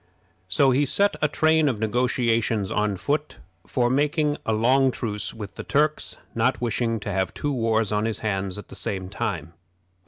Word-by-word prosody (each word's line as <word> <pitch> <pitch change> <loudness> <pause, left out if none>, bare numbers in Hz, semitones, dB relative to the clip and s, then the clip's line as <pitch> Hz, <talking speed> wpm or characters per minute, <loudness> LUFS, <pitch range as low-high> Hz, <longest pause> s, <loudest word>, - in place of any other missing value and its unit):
So 135 +9 +3
he 135 +3 +3
set 200 +8 +2
a 150 - +4
train 155 0 +3
of 125 - -2
negotiations 115 -2 0
on 105 -2 0
foot 145 +10 -2 0.3
for 125 -3 +1
making 145 +3 +1
a - - +2
long 130 +5 +3
truce 105 -4 -3
with 105 -3 -8
the - - -7
Turks, 150 +1 0 0.2
not 120 +3 +1
wishing 115 -1 -1
to 105 - -4
have 95 -2 -1
two 145 - -2
wars 115 -4 +1
on 105 +1 +1
his 115 -1 +1
hands 95 -3 -2
at 105 - -10
the - - -9
same 95 -2 -4
time. 85 -5 -4
115 Hz, 180 wpm, -24 LUFS, 105-135 Hz, 0.3 s, a